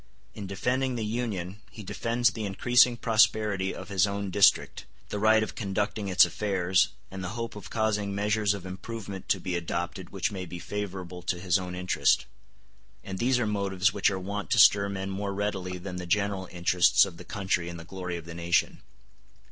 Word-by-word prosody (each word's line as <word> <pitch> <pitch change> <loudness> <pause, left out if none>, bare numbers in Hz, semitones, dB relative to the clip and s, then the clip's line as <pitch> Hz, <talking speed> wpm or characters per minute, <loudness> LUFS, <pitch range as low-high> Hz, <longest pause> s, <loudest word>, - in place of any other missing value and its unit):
In 100 - -7
defending 125 +6 -1
the 115 -2 -2
Union 105 -4 -3
he 110 +3 -10
defends 115 +4 +1
the 110 - -5
increasing 120 +4 +4
prosperity 105 -4 +2
of - - -9
his 100 0 +3
own 100 -1 -3
district, 100 +1 +3 0.2
the 105 - -3
right 110 +1 +4
of - - -5
conducting 100 0 -2
its 95 -1 +6
affairs, 95 -3 +1 0.2
and 95 -1 -6
the 95 +6 -5
hope 115 -1 -4
of 105 - -9
causing 105 -3 0
measures 105 0 +1
of 95 -2 -8
improvement 100 0 -7
to - - +2
be 90 -2 -3
adopted 85 +1 -4
which 95 0 -2
may 95 -2 -5
be 90 - -7
favorable 95 -2 -5
to 90 0 -2
his 90 +1 +2
own 90 -1 -6
interest; 90 0 +2 0.8
and 95 -1 -6
these 125 +1 +2
are 120 - 0
motives 100 -2 0
which 100 - +2
are 95 - -2
wont 100 +2 -5
to - - +2
stir 100 -1 +6
men 95 0 -4
more 100 0 -3
readily 95 -3 -2
than 90 0 -7
the 90 -1 -6
general 100 0 0
interests 90 +2 +4
of 90 -4 -9
the 90 - -10
country 90 -2 -2
and 85 -1 -7
the 85 - -10
glory 90 -1 -5
of 85 - -9
the 85 - -8
nation. 85 +1 0
100 Hz, 195 wpm, -28 LUFS, 90-105 Hz, 0.8 s, its